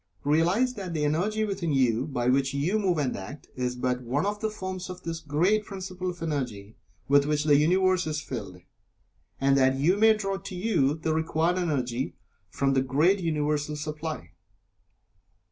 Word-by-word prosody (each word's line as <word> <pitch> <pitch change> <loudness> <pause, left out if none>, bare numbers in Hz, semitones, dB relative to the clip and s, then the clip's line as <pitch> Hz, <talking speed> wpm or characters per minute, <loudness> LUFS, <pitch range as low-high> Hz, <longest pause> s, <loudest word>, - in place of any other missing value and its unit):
Realize 175 - +2
that 185 -7 -6
the 150 -1 0
energy 205 +9 0
within 190 -5 -2
you 130 -1 +2
by 125 -4 -2
which 135 +1 +2
you 175 +10 +1
move 185 -5 +1
and 140 -4 0
act, 100 +10 -9
is 125 -1 -2
but 125 0 -1
one 130 +7 -1
of 205 +1 -2
the 220 - -1
forms 185 -3 -6
of 180 0 -8
this 165 -1 -4
great 175 +9 +1
Principle 185 -2 -5
of 175 -2 -6
Energy 125 -10 -4 0.3
with 140 +1 +4
which 150 0 +1
the 150 -1 +5
Universe 180 +4 +3
is 155 -1 -1
filled, 100 - -7 0.8
and 135 0 +3
that 130 -1 +4
you 170 +8 +3
may 220 +1 +6
draw 195 -2 -2
to 195 -1 -8
you 175 -8 +1
the 160 0 -1
required 160 +2 +1
Energy 130 -7 -1 0.3
from 135 0 0
the 135 - +3
great 150 +10 +2
Universal 150 -3 -1
supply. 150 +1 -5
155 Hz, 175 wpm, -27 LUFS, 135-185 Hz, 0.8 s, may